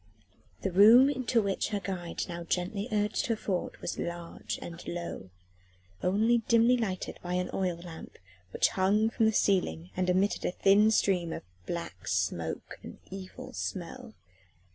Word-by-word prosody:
The 195 - 0
room 225 +9 +8
into 250 -4 +1
which 195 -1 0
her 210 -1 -2
guide 180 -3 -4
now 170 -1 -5
gently 185 +5 -2
urged 210 0 0
her 230 - +1
forward 190 -4 -3
was - - -4
large 170 -1 -5
and 170 0 -8
low, 170 - -5 0.7
only 220 +6 +3
dimly 235 +2 +5
lighted 200 -7 -3
by 180 0 -3
an 180 0 -1
oil 180 -3 -1
lamp 170 -1 -10 0.3
which - - +3
hung 210 +4 +2
from 225 -1 +2
the - - +4
ceiling 95 - +1
and 185 0 0
emitted 190 +3 +1
a - - 0
thin 200 +4 +5
stream 185 -6 +2
of - - -5 0.2
black 170 - -5
smoke 85 -3 -2
and - - -10
evil 190 -1 -8
smell. 220 +6 -5
190 Hz, 155 wpm, -30 LUFS, 175-215 Hz, 0.7 s, room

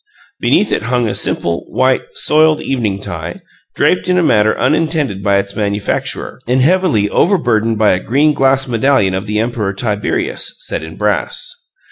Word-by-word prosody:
Beneath - - +2
it - - 0
hung 125 -2 +1
a 105 - -1
simple, 85 0 -1
white, 130 0 +2
soiled 155 0 +3
evening 115 -7 -2
tie, 85 -4 -6 0.4
draped 180 0 +1
in 180 - +3
a 180 - +3
manner 110 -7 +3
unintended 150 - 0
by 100 0 +2
its 100 0 -3
manufacturer, 100 -1 -3
and 125 +2 +2
heavily 155 - +2
overburdened 115 - +1
by 105 -1 +3
a 90 - +1
green 145 +9 +2
glass 135 -1 +2
medallion 120 -4 +2
of 95 +3 -3
the 105 +1 -1
Emperor 110 -3 -1
Tiberius, 105 -1 -2
set - - -4
in 80 0 -9
brass. 105 0 -1
115 Hz, 160 wpm, -15 LUFS, 100-135 Hz, 0.4 s, soiled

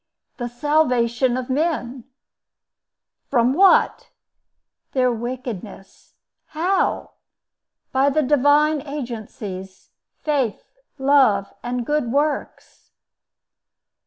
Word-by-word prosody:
"The 240 - -3
salvation 250 -2 +1
of 255 -1 -4
men." 265 -4 -2 1.2
"From 245 -1 +3
what?" 380 +5 +4 0.8
"Their 255 -2 +2
wickedness." 235 -5 -7 0.3
"How?" 355 +5 -1 0.8
"By 270 +2 +3
the 305 +2 +1
divine 295 +2 +3
agencies—Faith, 230 0 -5 0.3
Love, 265 -8 +3
and 245 0 -3
Good 295 -4 -1
Works." 290 +2 -3
260 Hz, 75 wpm, -21 LUFS, 235-295 Hz, 1.2 s, what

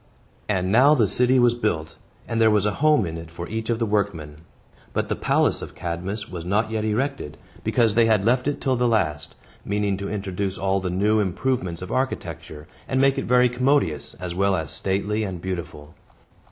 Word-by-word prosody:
And 95 -2 0
now 135 +7 +6
the 115 - +3
city 125 +6 +2
was 120 -1 +4
built, 85 -9 -2 0.3
and 115 0 -1
there 110 - +6
was 105 -2 +2
a 105 - +2
home 150 -8 +4
in 80 -1 -5
it 80 0 -10
for 85 +1 -7
each 110 +1 -4
of 115 - +1
the 115 - 0
workmen. 100 -8 -2 0.6
But - - -1
the - - 0
palace - - +1
of - - -8
Cadmus 90 +5 -4
was 90 -3 -7
not 105 +5 0
yet 110 -1 -1
erected, 115 - -2 0.3
because 115 -3 +2
they 115 0 +4
had 105 -3 +2
left 125 +3 +2
it 145 - -1
till 130 -1 +1
the 125 0 +1
last, 85 -10 0 0.3
meaning 100 -1 -1
to 100 0 -5
introduce 100 -1 -3
all 95 0 0
the 95 -1 -3
new 105 +4 +2
improvements 95 -3 -1
of 90 - -7
architecture, 80 - -4 0.2
and 130 - 0
make 135 0 +3
it - - -3
very 125 0 +4
commodious, 125 - 0
as 90 -1 -6
well 100 +1 +2
as 80 -3 -3
stately 100 +5 -1
and 95 -4 -4
beautiful. 85 -5 -6
100 Hz, 200 wpm, -23 LUFS, 90-115 Hz, 0.6 s, now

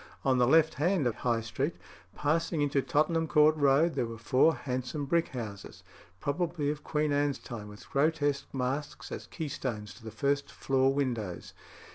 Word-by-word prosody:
On 130 -2 +3
the 120 - +4
left 160 +3 +5
hand 165 +2 +1
of 120 - +2
High 115 -1 0
Street, 130 +8 -2 0.4
passing 160 +1 0
into 140 -1 +1
Tottenham 160 +2 +1
Court 150 0 +5
Road, 145 +3 +3
there 125 -4 -1
were 115 0 -7
four 130 +8 +3
handsome 130 +3 -3
brick 170 +3 +2
houses, 105 -6 -7 0.4
probably 155 - -1
of 150 0 -7
Queen 150 -1 0
Anne's 145 -1 +1
time, 110 -4 -8
with 105 0 -12
grotesque 145 -1 +1
masks 135 +3 -3
as - - -6
keystones 130 - -4
to 120 - -16
the 110 - -6
first 140 +6 -1
floor 135 0 +2
windows. 120 -10 -3
140 Hz, 165 wpm, -30 LUFS, 125-150 Hz, 0.4 s, left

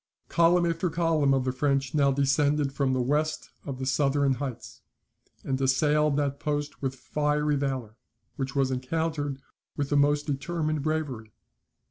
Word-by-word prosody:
Column 170 +1 +4
after 170 +1 0
column 165 -4 +2
of 135 -1 +2
the 130 - +1
French 135 0 0
now 140 -2 +3
descended 140 +1 +1
from 140 -2 0
the 130 -1 +1
west 155 +4 -1 0.2
of 135 -2 -4
the 130 - -4
southern 140 0 +2
heights, 130 -2 -6 0.6
and 135 0 -2
assailed 150 +2 +2
that 140 -1 -1
post 145 -1 -3
with 135 -1 -2
fiery 150 +2 0
valour, 130 -6 -3 0.4
which 135 0 -4
was 135 -1 +2
encountered 145 +1 -2 0.4
with 140 -1 -1
the 145 - +1
most 145 +1 +3
determined 155 +1 -2
bravery. 140 -8 -3
145 Hz, 150 wpm, -27 LUFS, 135-150 Hz, 0.6 s, Column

